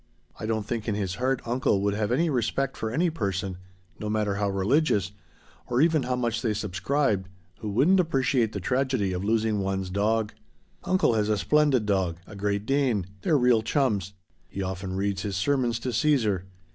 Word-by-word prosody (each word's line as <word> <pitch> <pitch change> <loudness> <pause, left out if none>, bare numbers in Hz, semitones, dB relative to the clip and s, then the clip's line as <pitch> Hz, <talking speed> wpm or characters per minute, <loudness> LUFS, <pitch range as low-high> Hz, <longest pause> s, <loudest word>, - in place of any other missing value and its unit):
I 110 - -4
don't 110 -2 -1
think 110 0 -3
in 105 - 0
his 95 -3 -2
heart 130 0 0
uncle 120 -4 +1
would 100 0 +1
have 105 +1 -1
any 165 +8 +2
respect 135 +2 0
for 110 - -3
any 165 +9 +1
person 95 - -3 0.4
no 105 - -3
matter 105 -2 0
how 100 0 0
religious 100 - +1 0.6
or 120 0 0
even 160 0 +4
how 125 0 -1
much 120 -2 -1
they 110 -3 0
subscribed 100 +1 0 0.3
who 110 - -4
wouldn't 145 - +4
appreciate 135 -8 +1
the 100 - -4
tragedy 125 -2 0
of 90 +1 -3
losing 110 0 +1
one's 95 -1 -2
dog. 105 +2 0 0.5
Uncle 185 -9 +3
has 105 -1 +1
a 105 - +2
splendid 145 0 +3
dog 95 -5 0
a 105 - -11
Great 100 +1 -1
Dane; 130 -7 +1 0.2
they're 150 - +3
real 125 -3 +4
chums. 110 - 0 0.4
He 100 - -4
often 95 0 -4
reads 100 0 -1
his 100 -2 -3
sermons 125 +1 +1
to 125 0 -3
Caesar. 110 - +2
110 Hz, 185 wpm, -26 LUFS, 100-130 Hz, 0.6 s, even